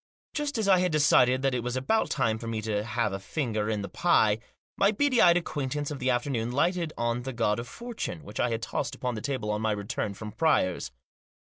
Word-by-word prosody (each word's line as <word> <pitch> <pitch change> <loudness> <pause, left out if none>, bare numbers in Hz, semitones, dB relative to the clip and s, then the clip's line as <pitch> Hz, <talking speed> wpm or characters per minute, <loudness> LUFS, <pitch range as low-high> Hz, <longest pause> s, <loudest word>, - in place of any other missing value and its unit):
Just 295 -3 -2
as 220 -2 0
I 190 -2 +6
had 180 -1 +1
decided 130 -4 +4
that 135 -1 +2
it 125 - 0
was 125 +1 -3
about 130 +13 +1
time 115 -5 0
for 115 - -7
me 115 -1 -2
to 105 -1 -1
have 120 -3 -1
a 95 - -3
finger 110 -1 -2
in 105 -2 -1
the - - -4
pie, 110 - +3 0.4
my 200 +1 +4
beady 255 +3 +2
eyed 175 -1 +7
acquaint 145 -5 -3
ance 145 0 -2
of 145 - -5
the 130 -1 0
afternoon 120 -2 0
lighted 170 +4 +1
on 120 +1 0
the 130 +1 -5
God 105 -2 +1
of 120 - -6
Fortune, 230 - -6
which - - -8
I 125 - +2
had 115 -1 -2
tossed - - -3
upon 125 -1 -3
the 110 - -5
table 125 -6 -2
on 105 0 -1
my 110 -1 +1
return 105 0 -3
from 105 +1 -7
Pryor's. 130 - +1
125 Hz, 235 wpm, -28 LUFS, 110-160 Hz, 0.4 s, eyed